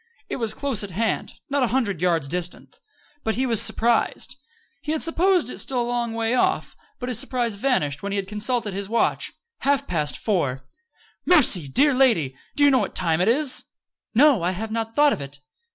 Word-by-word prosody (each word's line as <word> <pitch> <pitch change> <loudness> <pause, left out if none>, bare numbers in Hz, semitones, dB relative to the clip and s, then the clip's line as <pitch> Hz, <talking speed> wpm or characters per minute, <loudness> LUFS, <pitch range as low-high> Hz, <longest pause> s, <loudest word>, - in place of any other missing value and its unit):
It - - -3
was 225 -4 -2
close 270 -7 0
at 200 - -6
hand 220 +5 -2
not 280 0 -1
a 250 - +2
hundred 225 -9 -1
yards 165 -5 +1
distant. 175 +3 -3 0.5
He 250 +5 -1
was 230 -4 +5
surprised. 225 +2 +1 0.5
He 310 -1 -3
had 315 - +1
supposed 340 - +2
it - - -6
still 260 -2 -1
a - - +1
long 240 -1 -2
way 225 +1 -1
off. 255 - 0 0.2
But 250 - -6
his 250 - +2
surprise 240 -3 0
vanished 200 - -1
when 200 - -4
he - - -2
had 195 -1 -3
consulted 210 +1 -2
his 195 +1 -4
watch 230 +1 0 0.3
half 280 0 +1
past 155 -4 -2
four! 135 - -2 0.6
"Mercy! 230 - +4
Dear 280 - +3
lady! 225 - +2 0.2
Do 290 - +2
you 285 - +6
know 260 - +4
what - - -4
time 165 -2 +1
it 185 - +1
is?" 265 +3 +3 0.5
"No. 275 - +5
I 175 +2 0
have 220 +4 -5
not 225 0 -3
thought 295 -1 +4
of - - -5
it." 140 0 -8
225 Hz, 200 wpm, -23 LUFS, 185-260 Hz, 0.6 s, you